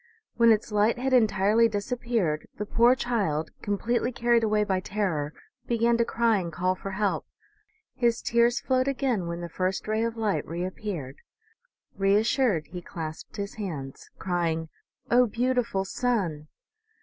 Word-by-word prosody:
When 230 0 +6
its 220 0 +1
light 210 +3 +2
had 260 +2 -1
entirely 220 -1 +4
disappeared 215 -6 -1
the 210 - -3
poor 235 +4 +4
child, 200 -12 -1
completely 230 +5 0
carried 235 -1 +2
away 210 -1 +2
by 190 -3 0
terror, 185 -7 -2 0.4
began 235 0 +2
to 235 - +2
cry 230 -3 +2
and 170 -2 -4
call 185 +3 0
for 190 +1 -7
help. 200 +1 -1 0.7
His 235 -2 +1
tears 235 +1 +3
flowed 255 0 +1
again 255 -9 0
when 170 0 -4
the 170 - -4
first 185 +4 -2
ray 215 +1 0
of 230 0 -2
light 215 -3 0
reappeared. 175 -4 -5 0.8
Reassured, 205 - +2
he 180 0 -8
clasped 160 0 -7
his 200 0 -4
hands, 140 -9 -6
crying, 165 -3 -1 0.2
" - - -23
O, 245 +1 +5
beautiful 235 -4 0
sun 190 -10 -1
210 Hz, 150 wpm, -27 LUFS, 180-235 Hz, 0.8 s, When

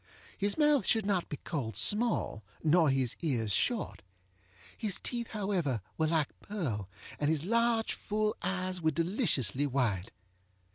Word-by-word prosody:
His 200 0 -1
mouth 295 -5 +4
should 220 -3 +2
not 195 -4 0
be 145 - -4
called 115 - -4
small, 210 - +2 0.2
nor 160 0 +4
his 135 -3 +1
ears 120 - 0
short. 240 - 0 0.7
His 205 -4 -1
teeth, 235 -2 -3
however, 190 - -1 0.2
were 160 - +1
like 155 -2 0
pearl, 125 - -4 0.3
and 145 - +1
his 155 -2 +1
large 230 +2 +2
full 215 0 -1
eyes 185 0 -2
were 160 - +3
deliciously 155 - +1
white. 115 -9 0
170 Hz, 140 wpm, -31 LUFS, 135-210 Hz, 0.7 s, mouth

